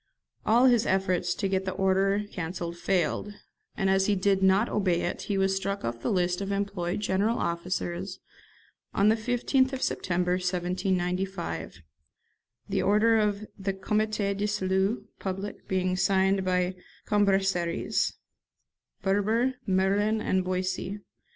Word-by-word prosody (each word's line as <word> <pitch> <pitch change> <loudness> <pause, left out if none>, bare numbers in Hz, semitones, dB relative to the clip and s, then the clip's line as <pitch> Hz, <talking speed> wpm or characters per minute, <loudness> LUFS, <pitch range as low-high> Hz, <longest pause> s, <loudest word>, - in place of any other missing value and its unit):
All 235 +4 +5
his 240 -3 +4
efforts 185 -2 +1
to 200 - -1
get 190 0 0
the 185 - -2
order 195 +2 +2
cancelled 170 -1 -4
failed, 190 +3 -1 0.4
and 195 - +1
as 190 0 +3
he 205 - +3
did 195 0 +2
not 190 +4 +4
obey 185 -4 +1
it 175 - -3
he 200 - +1
was 195 0 +2
struck 195 -2 -2
off 115 0 -4
the - - -1
list 180 -1 +1
of 200 0 -3
employed 200 -2 -2
general 210 +4 +1
officers 175 +2 -3 0.8
on 200 +2 +4
the 220 - +4
15th 250 +3 +1
of 265 - -3
September 180 0 0
1795, 180 - -2 0.8
the - - 0
order 220 +3 +4
of 210 0 0
the 195 0 -1
'Comité 210 +1 0
de 205 +1 -1
Salut 195 +1 0
Public' 195 +1 -5
being 185 -1 0
signed 190 0 +2
by 180 0 +1 0.3
Cambaceres, 195 -4 +1 0.9
Berber, 215 +6 +2
Merlin, 200 +3 +2
and 190 -3 +1
Boissy. 185 +2 -2
195 Hz, 135 wpm, -28 LUFS, 185-205 Hz, 0.9 s, All